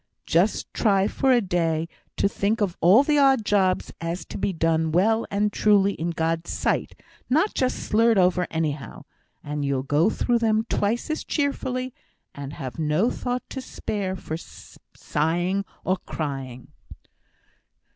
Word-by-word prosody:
Just 175 +6 +1
try 195 -2 +2
for 265 +4 +1
a 245 -2 +5
day 165 -4 0 0.3
to - - +3
think 205 +3 0
of 195 -5 0
all 195 - +7
the 295 0 +2
odd 270 -5 +4
jobs 190 -3 +1
as 165 +1 -2
has - - -10
to - - -7
be 195 - 0
done 160 -2 +1
well 220 +7 +2
and 205 +1 0
truly 200 -2 +4
as - - -13
in 165 +2 -1
God's 165 0 -1
sight, - - -1 0.3
not 315 +11 +2
just 255 -1 0
slurred 225 0 +2
over 180 -1 +3
anyhow, 155 -3 -3 0.4
and 150 0 -3
you'll 140 -2 0
go 145 +8 +2
through 240 +1 +1
them 220 -1 +2
twice 230 +9 -1
as 310 - -2
cheerfully, 260 -3 -2 0.4
and 140 0 -7
have 135 -2 -7
no 160 +9 +2
thought 250 0 -3
to 265 - -4
spare 200 -6 -4
for 160 -3 -5
sighing 175 +4 -3 0.2
or 185 +1 +1
crying." 135 -7 -6
190 Hz, 155 wpm, -24 LUFS, 160-225 Hz, 0.4 s, all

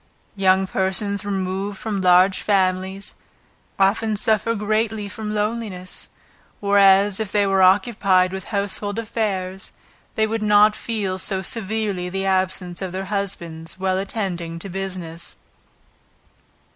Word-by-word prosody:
Young 190 -1 +3
persons 190 +1 -1
removed 195 0 -3
from 205 -1 -3
large 185 +1 +5
families 190 -1 0 0.6
often 210 +3 +2
suffer 220 +2 +1
greatly 215 0 -1
from 210 +1 -5
loneliness, 210 -4 -3 0.5
whereas, 200 0 +4
if 215 -3 -3
they 205 -1 +2
were 195 -1 +2
occupied 190 -1 +4
with 190 0 -5
household 205 0 -2
affairs, 195 -4 -3 0.4
they 220 - +3
would 225 0 -2
not 210 0 +5
feel 205 -5 -3
so 190 0 -2
severely 210 -4 -2
the 195 +1 -3
absence 185 -1 0
of 185 -2 -4
their 190 +1 -3
husbands 170 -4 -4
while 190 0 0
attending 180 -5 -3
to 180 +4 -8
business. 180 -3 -6
195 Hz, 120 wpm, -22 LUFS, 185-210 Hz, 0.6 s, large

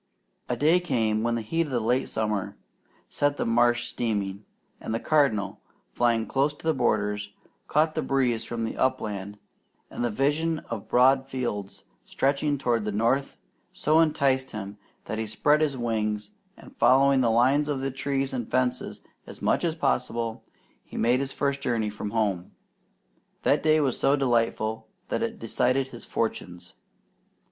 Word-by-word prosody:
A - - +1
day 160 +5 +4
came 110 -11 0
when 115 +1 0
the 115 - -3
heat 165 +8 -1
of - - -8
the 125 - +1
late 120 +4 0
summer 105 -3 -2 0.5
set 145 0 0
the - - -1
marsh 120 +1 +3
steaming, 105 -4 -2 0.4
and 110 - -3
the - - -1
Cardinal, 130 -11 +1 0.3
flying 115 -2 +2
close 140 +2 0
to - - -16
the 160 - +3
borders, 105 -5 0 0.4
caught 155 +1 +2
the - - -1
breeze 125 -4 +1
from 115 0 -4
the 110 - -4
upland; 105 -5 -1 0.5
and - - -4
the 120 - +1
vision 150 +8 0
of 110 -4 -5
broad 130 +2 +4
fields 110 -7 -4 0.2
stretching 140 - 0
toward 120 -4 0
the 105 - -2
north 115 +7 0 0.4
so 155 +2 +2
enticed 140 -5 +2
him 100 -1 -7 0.3
that 110 - -4
he 110 - -2
spread 150 +8 +2
his 145 -4 +1
wings, 105 -3 -2 0.3
and - - -15
following 135 +1 +5
the 120 - +3
line 130 +6 +3
of 135 -2 -2
trees 135 0 -2
and 120 -3 -3
fences 125 0 -1 0.3
as - - -10
much - - +1
as 165 -2 0
possible, 120 -6 -1 0.4
he - - -10
made 120 +2 +3
his 135 0 -3
first 140 0 -1
journey 115 -5 0
from 105 0 -5
home. 100 -5 -1 0.9
That - - +3
day 155 0 +4
was 135 -4 0
so 140 - +4
delightful 115 -4 0 0.2
it - - -1
decided 130 +1 0
his 120 -3 -10
fortunes. 90 - -4
120 Hz, 160 wpm, -26 LUFS, 110-140 Hz, 0.9 s, following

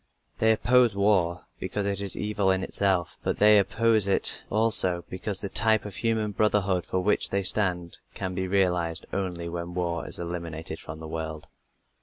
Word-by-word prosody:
They 110 0 +4
oppose 120 0 +3
war 90 -4 +1
because 100 +2 -3
it 100 0 -2
is 100 -2 -3
evil 105 -2 -1
in 95 0 +1
itself, 95 -3 -1
but - - -2
they 105 0 +6
oppose 110 0 +2
it 100 - +2
also 105 -6 +4
because 95 +2 -3
the 100 - -3
type 110 +2 +2
of 105 - -7
human 110 -2 0
brotherhood 100 -3 0
for 95 - -1
which 105 +3 +1
they 100 0 -1
stand 90 -3 0 0.2
can 95 -1 -4
be 95 0 -3
realized 90 -3 0
only 90 -3 -3
when 85 +1 -6
war 85 -2 -2
is - - -3
eliminated 85 -2 -6
from 80 0 -9
the 80 - -7
world. 80 -1 -6
95 Hz, 175 wpm, -26 LUFS, 85-105 Hz, 0.2 s, they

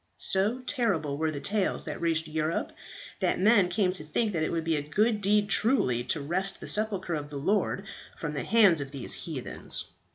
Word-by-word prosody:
"So 210 +7 +1
terrible 195 - 0
were 160 0 +1
the 150 -2 -4
tales 205 +4 -1
that - - -5
reached 165 -1 +1
Europe 155 +1 -2 0.5
that - - +1
men 200 -2 +5
came 180 +1 +1
to 185 -4 -2
think 210 +8 -1
that 165 - -1
it 155 - 0
would 165 -1 -1
be 165 0 +1
a 145 - 0
good 210 +9 +1
deed 205 +1 +3
truly, 200 - +2
to 160 - -1
wrest 190 +6 -1
the - - -8
sepulchre 205 -5 +1
of 145 -2 -4
the 145 - -6
Lord 195 +5 0 0.3
from 150 -2 -4
the 140 - -2
hands 195 - +5
of 140 - -5
these 135 -3 -2
heathens. 150 -7 -4
175 Hz, 200 wpm, -28 LUFS, 155-210 Hz, 0.5 s, men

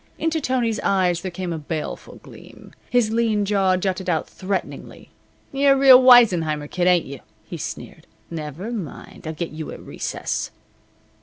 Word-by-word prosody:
Into 320 0 -1
Tony's 245 -5 0
eyes 180 -3 +1
there 185 - -4
came 180 -1 -5
a 160 - -4
baleful 155 +1 -6
gleam. - - -15 0.2
His 245 -3 +2
lean 225 -3 +1
jaw 195 -2 +2
jutted 185 0 -2
out 160 -3 0
threateningly. 190 0 -6 0.4
"You're 275 0 +3
the - - -1
real 260 -2 +8
Weissenheimer 180 -13 +5
kid, 180 +3 -1
ain't 180 -2 +3
you?" 135 -1 -8 0.3
he - - -7
sneered. - - -8 0.2
"Never 160 - -6
mind. 185 - -8
I'll 160 - -3
get 165 +2 -5
you 155 0 -7
at - - -9
recess." - - -4
185 Hz, 160 wpm, -22 LUFS, 165-230 Hz, 0.4 s, real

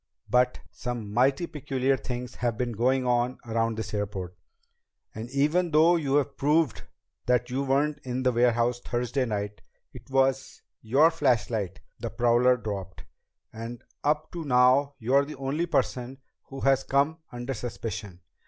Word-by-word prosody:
But 125 0 +2
some 120 -4 -5
mighty 135 +8 +3
peculiar 135 -3 0
things 125 -1 -5
have 120 -3 -1
been 125 -1 -1
going 130 +4 +1
on 125 +1 +1
around 115 -1 0
this 110 - -5
airport. 100 -3 -3 0.8
And 110 +2 -7
even 150 +7 +2
though 160 +3 +5
you 145 -3 +2
proved 145 +1 +1 0.5
that 125 0 +2
you 130 +2 0
weren't 140 +2 +1
in 130 0 -3
the 130 - +3
warehouse 120 0 +2
Thursday 125 +2 -1
night, 105 -2 -4 0.3
it - - -13
was 135 0 0 0.2
your 140 +9 +4
flashlight 115 - 0 0.2
the - - -3
prowler 120 +1 +3
dropped, 100 -5 -6 0.5
and 115 +2 -7 0.2
up 150 +1 0
to 170 -2 -5
now 135 +1 +4
you're 130 +4 +3
the 150 +2 -7
only 140 +6 -1
person 130 -3 -1 0.3
who 135 0 -9
has 135 -1 +3
come 145 +5 +1
under 120 +2 -4
suspicion. 110 -6 -6
125 Hz, 145 wpm, -27 LUFS, 115-140 Hz, 0.8 s, though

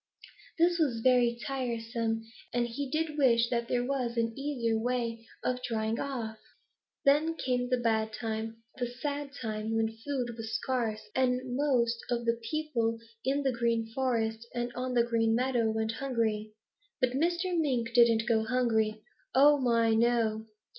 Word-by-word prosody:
This 345 +1 +3
was 255 -8 +1
very 245 -1 +4
tiresome 230 -3 -2 0.3
and 240 0 +1
he 270 +4 -4
did 310 +1 -1
wish 235 -3 +4
that 235 -1 0
there 245 0 0
was 250 -3 -2
an 230 0 +1
easier 265 -5 -1
way 230 -1 -2 0.2
of 250 0 -1
drying 225 -2 -1
off. 230 -6 -4 0.7
"Then 300 +4 +4
came 250 -4 -1
the 255 - +2
bad 220 -2 +1
time, 225 0 -4 0.2
the 245 - 0
sad 285 +4 -4
time, 220 -1 -3
when 225 0 0
food 265 -4 -2
was 225 -1 -5
scarce, 230 -5 -2
and 255 -1 0
most 245 -5 +2
of 235 -1 -1
the 230 - +4
little 230 0 -7
people 250 -8 0 0.3
in 280 +2 +1
the 265 - +2
Green 230 -1 0
Forest 230 -3 -1
and 240 0 -2
on 250 0 -3
the 235 - +5
Green 225 -1 +2
Meadow 245 -2 +1
went 220 0 0
hungry. 225 -4 -1 0.5
But 255 - +2
Mr. 345 +6 0
Mink 250 -8 0
didn't 230 -1 +5
go 225 -2 +3
hungry. 220 -3 +1 0.3
Oh, 290 +2 +7
my, 230 -3 +3
no! 225 -1 +2
235 Hz, 160 wpm, -30 LUFS, 225-260 Hz, 0.7 s, Oh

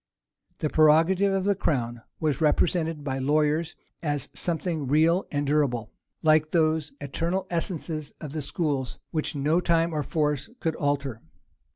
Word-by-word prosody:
[*] - - -46
The 155 - +1
prerogative 165 +6 +4
of 195 -1 0
the 200 +1 +3
crown 120 -10 -1 0.2
was 155 -1 0
represented 160 0 +1
by 135 -2 -2
lawyers 150 +4 +1 0.3
as 145 -3 -1
something 165 -4 -1
real 160 +6 +3
and 145 0 -1
durable; 135 -6 0 0.3
like 155 -1 +4
those 155 -2 +1
eternal 170 +7 -2
essences 165 -3 -3
of 150 -4 -7
the 155 +1 -3
schools, 140 -4 -2
which 155 0 -1
no 150 +4 +2
time 170 -1 +2
or 150 - 0
force 150 -1 -1
could 160 -1 -1
alter. 140 -5 -1
155 Hz, 150 wpm, -26 LUFS, 145-165 Hz, 0.3 s, prerogative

